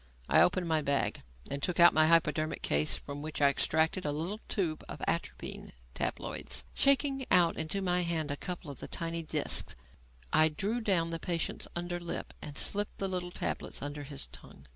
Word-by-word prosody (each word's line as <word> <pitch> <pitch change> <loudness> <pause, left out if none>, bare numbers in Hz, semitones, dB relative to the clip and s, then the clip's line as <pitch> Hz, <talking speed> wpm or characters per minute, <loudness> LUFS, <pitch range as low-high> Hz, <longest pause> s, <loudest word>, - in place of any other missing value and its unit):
I - - +6
opened 180 -1 +3
my 160 -1 +2
bag 140 -1 0 0.3
and 140 0 -2
took 180 +4 -1
out 175 0 +9
my 155 0 +5
hypodermic 155 -1 +2
case 75 +1 +2
from 140 0 -7
which 155 +1 -5
I 140 -1 +6
extracted 160 +5 +1
a 150 - 0
little 170 +8 -3
tube 170 -6 -1
of - - -6
atropine - - -3 0.2
tabloids. - - -3
Shaking 275 -1 +3
out 170 -2 +5
into 160 +5 -2
my 180 -1 +2
hand 165 -4 -1
a - - -1
couple 170 -1 -6
of 140 - -11
the - - -6
tiny 165 0 -3
discs, 160 - -1 0.6
I 155 0 +6
drew 205 +10 -2
down 175 -6 +2
the 165 - -2
patient's 170 0 -2
under 175 0 -3
lip 175 -1 -5
and 145 0 -7
slipped 205 0 0
the 195 - -1
little 180 -1 -3
tablets 175 - -3
under 145 +1 -4
his 140 -1 -6
tongue. 70 - -14
165 Hz, 185 wpm, -31 LUFS, 150-180 Hz, 0.6 s, out